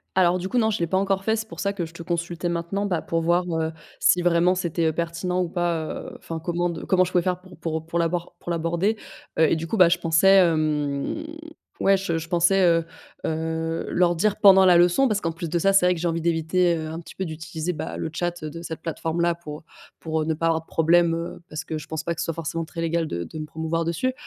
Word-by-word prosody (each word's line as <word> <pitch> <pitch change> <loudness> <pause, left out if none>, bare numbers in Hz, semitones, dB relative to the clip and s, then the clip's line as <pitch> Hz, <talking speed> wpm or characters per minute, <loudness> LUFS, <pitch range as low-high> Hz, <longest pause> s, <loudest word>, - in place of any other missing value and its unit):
Alors 180 -1 +4
du 185 - -4
coup, 245 +5 +1
non, 220 -1 +3
je 215 - 0
l'ai 170 - +1
pas 190 - +1
encore 195 0 0
fait. 220 +2 +2
C'est 220 0 -4
pour - - -10
ça 200 0 0
que 180 -4 -3
je 160 - -16
te 170 - -8
consultais 170 0 -3
maintenant, 170 +4 -2
bah, 180 -5 -1
pour 165 0 -1
voir, 175 +2 +2
heu, 160 0 -1 0.3
si 180 - +4
vraiment 175 +1 +3
c'était, 170 -2 -1
heu, 160 - +2
pertinent 170 +2 -2
ou 175 - -2
pas, 170 -3 -1
heu, - - -7
enfin, 165 -1 -6
comment 175 0 0
de 165 -1 -6
comment 185 -1 +3
je 180 - -3
pouvais 175 - +2
faire 180 0 -1
pour 185 -1 -15
pour 160 -1 -3
pour 170 - -2
l'abord 170 +1 -1
pour 175 - -5
l'aborder. 170 +5 0 0.4
Heu, 160 -2 +5
et - - +4
du 160 +1 -4
coup, 200 - -2
bah, 180 -3 +7
je 175 - +3
pensais, 175 +3 +4
hem, 155 - +1 0.5
ouais, 195 0 +4
je 180 -4 -2
je 160 - -8
pensais, 175 +3 +3
heu 165 -2 +3 0.4
heu, 160 +1 -2
leur 175 -1 +2
dire 210 +4 +2
pendant 190 -1 +7
la 180 -1 +6
leçon 175 +10 +4
parce 215 -4 0
qu'en 165 - -1
plus 165 0 -6
de 170 - 0
ça. 195 +3 +3
C'est 195 -2 +5
vrai 180 - +3
que 165 - -6
j'ai 175 - -1
envie 165 0 -1
d'éviter, 170 +2 +2
heu, 155 -1 -5
un 160 +1 -5
petit 170 - -12
peu 190 - -3
d'utiliser, 160 +1 -4
bah, 155 0 -5
le - - -3
tchat 175 0 -3
de 160 +2 -6
cette 160 -1 -6
plateforme-là 170 +1 -1
pour 155 -3 -9 0.4
pour, 160 -1 -2
heu, - - -1
ne 160 0 0
pas 165 - -2
avoir 165 -1 +2
de - - -26
problème, 165 +1 +3
heu, 170 +1 -6
parce 155 +1 -5
que 160 -1 -4
je 150 - -11
pense 160 0 -4
pas 170 - -1
que 165 - -5
ce - - -1
soit 165 - -2
forcément 165 0 -3
très 165 +1 -7
légal 165 0 0
de 85 - -3
de 155 - -8
me 155 - -4
promouvoir 160 +2 -2
dessus, 170 +11 -1
170 Hz, 265 wpm, -24 LUFS, 160-180 Hz, 0.5 s, bah